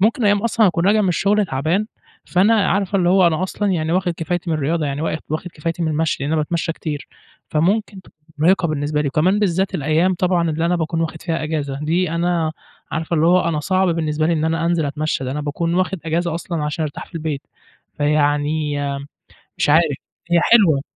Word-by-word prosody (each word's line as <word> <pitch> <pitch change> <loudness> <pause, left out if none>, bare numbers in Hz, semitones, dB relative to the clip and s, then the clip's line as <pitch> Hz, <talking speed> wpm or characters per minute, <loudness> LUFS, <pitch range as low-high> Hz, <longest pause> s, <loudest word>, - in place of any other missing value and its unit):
ممكن 220 +4 +2
أيام 205 0 +3
أصلًا 230 -1 +3
هاكون 175 -1 +1
راجع 215 +2 +4
من 200 - +1
الشُّغل 200 +4 +2
تعبان، 160 +8 0 0.4
فأنا 195 +5 +3 0.2
عارفة 195 0 +1
اللي 175 -2 +2
هو 185 0 +5
أنا 170 +1 +1
أصلًا 205 +2 -1
يعني 160 -2 -1
واخد 180 -1 +1
كفايتي 175 +1 -3
من 160 - +1
الرياضة، 155 +2 0
يعني 140 +1 -3
وا 160 - 0
واخد 155 - -4
واخد 160 +4 -4
كفايتي 165 +2 -3
من 160 - 0
المشي، 155 -2 -1
لإن 145 +3 -1
أنا 155 -1 +2
باتمشى 165 +1 -2
كتير، 150 -3 -6 0.4
فممكن 195 +5 0
تبقى - - -22 0.2
مُرهقة 170 +2 +3
بالنسبة 150 0 -1
لي، 145 - 0
وكمان 175 +8 +2
بالذات 190 -1 0
الأيام 160 +6 +2
طبعًا 175 -2 +1
اللي 160 +2 -1
أنا 175 +1 +1
باكون 165 0 -2
واخد 160 -1 -3
فيها 165 -2 -2
إجازة، 145 -3 -3
دي 170 +2 +1
أنا 170 -1 0 0.4
عارفة 165 +1 -2
اللي 160 +1 +3
هو 180 +2 +5
أنا 155 -3 -1
صعب 185 +3 +1
بالنسبة 155 -2 0
لي 170 - +2
إن 160 -1 0
أنا 165 +1 0
أنزِل 170 -3 +1
أتمشى، 150 -1 -2
ده 130 - -3
أنا 145 +3 -3
باكون 160 +3 -2
واخد 185 +1 0
إجازة 165 +1 -1
أصلًا 170 -1 -3
علشان 150 +2 -2
أرتاح 150 -2 -5
في - - -23
البيت، 155 -4 -3 0.6
فيعني 150 0 +1 0.8
مش - - +1
عارف 155 -2 +4 0.3
هي 170 0 +4
حلوة. 175 -11 +4
165 Hz, 210 wpm, -20 LUFS, 155-180 Hz, 0.8 s, هو